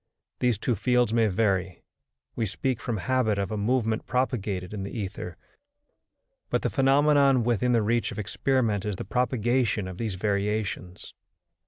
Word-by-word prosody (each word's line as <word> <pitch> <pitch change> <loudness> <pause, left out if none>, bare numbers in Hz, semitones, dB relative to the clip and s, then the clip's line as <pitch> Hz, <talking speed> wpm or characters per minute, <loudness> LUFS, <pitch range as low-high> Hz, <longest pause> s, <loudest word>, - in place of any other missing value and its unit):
These 125 -4 +2
two 120 - 0
fields 120 +1 +2
may 115 -1 +3
vary; 95 -3 0 0.5
we 115 - -1
speak 130 +6 -2
from 115 -3 -2
habit 110 +1 +1
of 100 0 -2
a - - -1
movement 110 +1 0
propagated 105 -7 -1
in 105 - -4
the 100 - -4
ether, 95 -5 -5 1.1
but - - 0
the - - 0
phenomenon 140 -1 +4
within 120 +1 +1
the 115 -2 +3
reach 115 +2 0
of - - -8
experiment 110 0 0
is 105 -2 -2
the - - -6
propagation 120 -1 0
of 95 -1 -8
these 110 -5 -2
variations. 100 -2 -2
110 Hz, 155 wpm, -27 LUFS, 100-125 Hz, 1.1 s, phenomenon